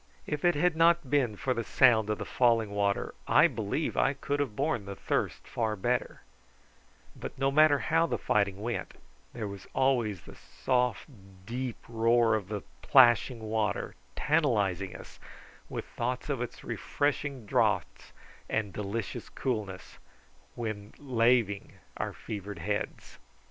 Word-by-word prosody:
If 150 Hz, -1 st, -3 dB
it 175 Hz, -2 st, +4 dB
had 170 Hz, +3 st, +2 dB
not 165 Hz, -3 st, +3 dB
been 130 Hz, -7 st, +2 dB
for 130 Hz, +6 st, -1 dB
the 115 Hz, -, -2 dB
sound 110 Hz, -2 st, +4 dB
of 105 Hz, -, 0 dB
the -, -, -5 dB
falling 115 Hz, -4 st, +2 dB
water 100 Hz, -1 st, 0 dB
I -, -, +6 dB
believe -, -, -2 dB
I -, -, +3 dB
could 145 Hz, +1 st, -3 dB
have 135 Hz, -7 st, -1 dB
borne 105 Hz, -1 st, -1 dB
the 100 Hz, 0 st, -6 dB
thirst -, -, -2 dB
far 110 Hz, -2 st, -1 dB
better; 120 Hz, +4 st, -1 dB, 0.9 s
but -, -, -7 dB
no 135 Hz, +1 st, +1 dB
matter 155 Hz, 0 st, +6 dB
how 165 Hz, +3 st, +2 dB
the -, -, -1 dB
fighting 100 Hz, -1 st, 0 dB
went, 120 Hz, 0 st, -3 dB, 0.4 s
there 110 Hz, -3 st, -4 dB
was 100 Hz, -1 st, -9 dB
always 120 Hz, -8 st, +1 dB
the -, -, -13 dB
soft 125 Hz, -4 st, -1 dB, 0.4 s
deep 125 Hz, +2 st, -4 dB
roar 115 Hz, 0 st, +3 dB
of 105 Hz, -4 st, -1 dB
the 105 Hz, -1 st, -4 dB, 0.2 s
plashing 120 Hz, -2 st, +5 dB
water 110 Hz, -1 st, -1 dB, 0.2 s
tantalising 100 Hz, -, +1 dB
us -, -, -12 dB, 0.5 s
with -, -, -4 dB
thoughts 125 Hz, +4 st, -3 dB
of 135 Hz, -4 st, -1 dB
its 125 Hz, -, -6 dB
refreshing 145 Hz, -4 st, -2 dB
draughts -, -, 0 dB, 0.4 s
and 105 Hz, -3 st, -1 dB
delicious 105 Hz, +1 st, -4 dB
coolness 105 Hz, -7 st, -4 dB, 0.6 s
when 110 Hz, -3 st, -5 dB
laving 115 Hz, -6 st, +1 dB, 0.2 s
our -, -, -3 dB
fevered 100 Hz, -1 st, -7 dB
heads. 100 Hz, +5 st, -4 dB
115 Hz, 145 wpm, -29 LUFS, 105-130 Hz, 0.9 s, I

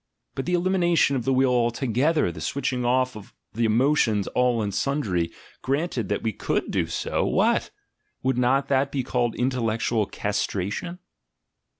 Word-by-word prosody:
But 135 Hz, -, -4 dB
the 180 Hz, -, +2 dB
elimination 175 Hz, -5 st, +2 dB
of 125 Hz, -, -2 dB
the 135 Hz, -, +2 dB
will 130 Hz, 0 st, +3 dB
altogether, 125 Hz, -, +1 dB
the 80 Hz, -, -9 dB
switching 125 Hz, -, -2 dB
off 125 Hz, 0 st, +1 dB
of 105 Hz, -2 st, -12 dB, 0.2 s
the 115 Hz, +1 st, 0 dB
emotions 115 Hz, -3 st, +2 dB
all 125 Hz, -3 st, +1 dB
and 100 Hz, -1 st, -3 dB
sundry, 100 Hz, -, 0 dB, 0.3 s
granted 135 Hz, -, -1 dB
that 100 Hz, -, -1 dB
we 110 Hz, -1 st, -1 dB
could -, -, -2 dB
do -, -, 0 dB
so, -, -, -1 dB
vvhat! -, -, +2 dB, 0.5 s
would 130 Hz, -1 st, +1 dB
not 130 Hz, +3 st, +2 dB
that 135 Hz, 0 st, +2 dB
be 135 Hz, -2 st, -1 dB
called 120 Hz, -2 st, -1 dB
intellectual 115 Hz, -3 st, 0 dB
castration? 105 Hz, -, -3 dB
125 Hz, 155 wpm, -25 LUFS, 110-140 Hz, 0.5 s, will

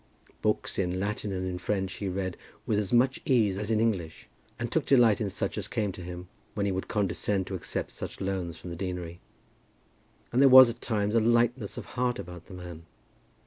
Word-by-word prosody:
Books -, -, 0 dB
in 90 Hz, -1 st, 0 dB
Latin 105 Hz, +1 st, -2 dB
and 95 Hz, -1 st, -2 dB
in 90 Hz, -1 st, -3 dB
French 95 Hz, -2 st, -2 dB
he 100 Hz, -, -3 dB
read 95 Hz, -1 st, -3 dB, 0.3 s
with 105 Hz, -, +1 dB
as 100 Hz, -3 st, -2 dB
much 130 Hz, +2 st, +3 dB
ease 110 Hz, -7 st, +3 dB
as 105 Hz, +2 st, -4 dB
in 110 Hz, -1 st, +2 dB
English, 95 Hz, -8 st, -1 dB, 0.3 s
and -, -, -4 dB
took -, -, 0 dB
delight 120 Hz, -5 st, +5 dB
in 105 Hz, -, 0 dB
such -, -, -3 dB
as -, -, -4 dB
came 105 Hz, -3 st, -1 dB
to 90 Hz, -, -10 dB
him, 90 Hz, 0 st, -7 dB, 0.3 s
when 100 Hz, -1 st, 0 dB
he 100 Hz, -, +1 dB
would 95 Hz, 0 st, -3 dB
condescend 100 Hz, -1 st, 0 dB
to 95 Hz, -, -7 dB
accept 95 Hz, -, -3 dB
such -, -, -7 dB
loans 95 Hz, -3 st, -3 dB
from 90 Hz, -, -8 dB
the -, -, -5 dB
deanery. 90 Hz, -1 st, -5 dB, 1.1 s
And 125 Hz, -, +3 dB
there 140 Hz, -, +8 dB
was 130 Hz, -2 st, +10 dB
at 120 Hz, -, -12 dB
times 105 Hz, -2 st, 0 dB
a 115 Hz, -, +5 dB
lightness 120 Hz, -1 st, +2 dB
of -, -, -6 dB
heart 125 Hz, -1 st, -1 dB
about 90 Hz, -3 st, -9 dB
the 95 Hz, -, -10 dB
man. 85 Hz, -2 st, -9 dB
100 Hz, 210 wpm, -28 LUFS, 90-115 Hz, 1.1 s, was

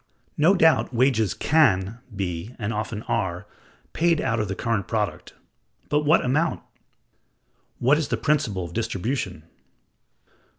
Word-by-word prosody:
No 165 Hz, +6 st, +4 dB
doubt 160 Hz, -6 st, +3 dB
wages 120 Hz, -4 st, +2 dB
can 115 Hz, -9 st, +2 dB, 0.2 s
be 95 Hz, +3 st, -4 dB
(and 110 Hz, 0 st, -3 dB
often 105 Hz, +1 st, -4 dB
are) 90 Hz, +1 st, -2 dB, 0.5 s
paid 170 Hz, -1 st, +2 dB
out 115 Hz, -4 st, 0 dB
of 105 Hz, -, -1 dB
the 95 Hz, -, -3 dB
current 115 Hz, -3 st, -1 dB
product; 100 Hz, -6 st, -3 dB, 0.5 s
but 150 Hz, 0 st, +1 dB
what 155 Hz, -1 st, +4 dB
amount? 155 Hz, +6 st, 0 dB, 1.2 s
What 135 Hz, +5 st, +3 dB
is 155 Hz, -, -2 dB
the -, -, -1 dB
principle 115 Hz, -12 st, 0 dB
of 85 Hz, -, -10 dB
distribution? 110 Hz, -, -3 dB
115 Hz, 130 wpm, -24 LUFS, 95-150 Hz, 1.2 s, No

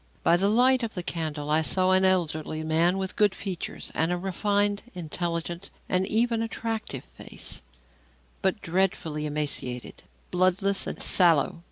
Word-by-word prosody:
By 170 Hz, -, +5 dB
the 195 Hz, +3 st, +2 dB
light 255 Hz, +4 st, +4 dB
of 230 Hz, -2 st, -3 dB
the 180 Hz, -, -3 dB
candle 155 Hz, -3 st, -3 dB
I 155 Hz, +1 st, +4 dB
saw 185 Hz, +3 st, +2 dB
an 185 Hz, 0 st, +4 dB
elderly 160 Hz, -4 st, 0 dB
man 165 Hz, +4 st, +2 dB
with 190 Hz, -1 st, -3 dB
good 205 Hz, -2 st, +3 dB
features 190 Hz, -4 st, -5 dB
and 160 Hz, +2 st, +1 dB
a 180 Hz, -, 0 dB
refined, 205 Hz, +2 st, 0 dB
intelligent 170 Hz, +1 st, -3 dB, 0.2 s
and 185 Hz, +1 st, +1 dB
even 230 Hz, +1 st, +1 dB
attractive 225 Hz, -, -3 dB
face, -, -, -8 dB, 0.8 s
but 195 Hz, +2 st, 0 dB
dreadfully 165 Hz, -4 st, 0 dB
emaciated, 145 Hz, -5 st, -3 dB, 0.3 s
bloodless 185 Hz, +2 st, +2 dB
and -, -, -5 dB
sallow. 170 Hz, -5 st, +4 dB
180 Hz, 145 wpm, -27 LUFS, 160-200 Hz, 0.8 s, By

